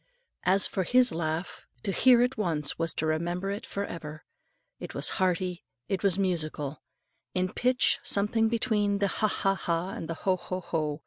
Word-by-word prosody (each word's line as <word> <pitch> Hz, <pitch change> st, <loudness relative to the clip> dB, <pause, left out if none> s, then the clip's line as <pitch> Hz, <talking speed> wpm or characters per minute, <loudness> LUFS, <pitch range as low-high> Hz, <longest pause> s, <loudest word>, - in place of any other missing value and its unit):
As 190 Hz, +2 st, +5 dB
for 190 Hz, -, 0 dB
his 250 Hz, +6 st, +4 dB
laugh, 160 Hz, +1 st, -3 dB, 0.2 s
to 200 Hz, -, 0 dB
hear 245 Hz, +4 st, +5 dB
it 250 Hz, +1 st, 0 dB
once 160 Hz, -9 st, -1 dB
was 165 Hz, 0 st, +1 dB
to 160 Hz, -, -1 dB
remember 175 Hz, +5 st, -1 dB
it 200 Hz, -, -5 dB
for 200 Hz, 0 st, -3 dB
ever. 155 Hz, -2 st, -8 dB, 0.6 s
It -, -, -8 dB
was -, -, +1 dB
hearty, 180 Hz, -1 st, 0 dB, 0.2 s
it 195 Hz, -, -1 dB
was 195 Hz, -3 st, +2 dB
musical; 155 Hz, -6 st, -2 dB, 0.5 s
in 185 Hz, 0 st, 0 dB
pitch 250 Hz, +1 st, +2 dB
something 220 Hz, +2 st, +1 dB
between 215 Hz, -3 st, +1 dB
the 200 Hz, 0 st, +1 dB
Ha! 215 Hz, +2 st, +1 dB
ha! 195 Hz, -1 st, +1 dB
ha! 175 Hz, -1 st, -2 dB
and 165 Hz, -, -6 dB
the 165 Hz, -, -3 dB
HO! 185 Hz, +2 st, 0 dB
HO! 185 Hz, +1 st, -5 dB
HO! 155 Hz, -3 st, -2 dB
185 Hz, 180 wpm, -28 LUFS, 165-200 Hz, 0.6 s, As